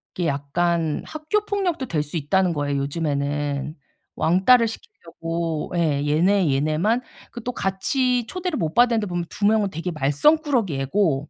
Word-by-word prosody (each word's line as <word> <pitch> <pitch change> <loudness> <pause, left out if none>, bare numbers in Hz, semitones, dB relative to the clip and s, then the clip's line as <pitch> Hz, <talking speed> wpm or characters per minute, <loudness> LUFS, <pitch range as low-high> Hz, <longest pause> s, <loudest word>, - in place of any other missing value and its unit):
이게 175 -2 -1
약간 160 +3 -1
학교 315 +7 -2
폭력도 370 -9 -1
될 150 -2 -1
수 150 +3 -4
있다는 180 +4 +1
거예요 145 -1 -1
요즘에는. 145 0 -2 0.4
왕따를 210 +8 +4
시키려고 165 -6 -5
예. 150 -4 +1
얘네 165 +1 +3
얘네만 155 - +1 0.3
그 240 - -8
또 250 +1 -3
같이 245 +6 0
초대를 360 +1 -3
못 160 -7 -2
받았는데 235 -3 +3
보면 175 -1 -2
두 205 - -3
명은 215 -1 +3
되게 175 +1 -4
말썽꾸러기 195 - +2
애고 150 -2 0
175 Hz, 320 characters per minute, -23 LUFS, 150-230 Hz, 0.4 s, 왕따를